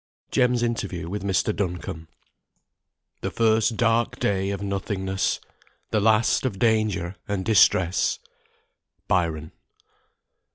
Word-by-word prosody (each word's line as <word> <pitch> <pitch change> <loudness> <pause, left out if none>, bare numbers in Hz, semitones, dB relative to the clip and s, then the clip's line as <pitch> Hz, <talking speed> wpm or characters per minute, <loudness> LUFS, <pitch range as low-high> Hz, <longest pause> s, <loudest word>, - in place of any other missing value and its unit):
JEM'S 125 -1 +2
INTERVIEW 100 -8 -2
WITH 105 +3 -4
MR. 100 +2 0
DUNCOMBE. 90 -4 -4 1.1
"The - - -2
first 110 0 +2
dark 115 0 +1
day 95 -1 0
of 100 0 -3
nothingness, 95 -1 -1 0.5
The 110 - +2
last 110 +2 +3
of 125 -7 -2
danger 105 -5 +1
and 100 -2 -2
distress." 95 -5 +3 0.9
BYRON. 80 -3 0
100 Hz, 100 wpm, -24 LUFS, 95-110 Hz, 1.1 s, last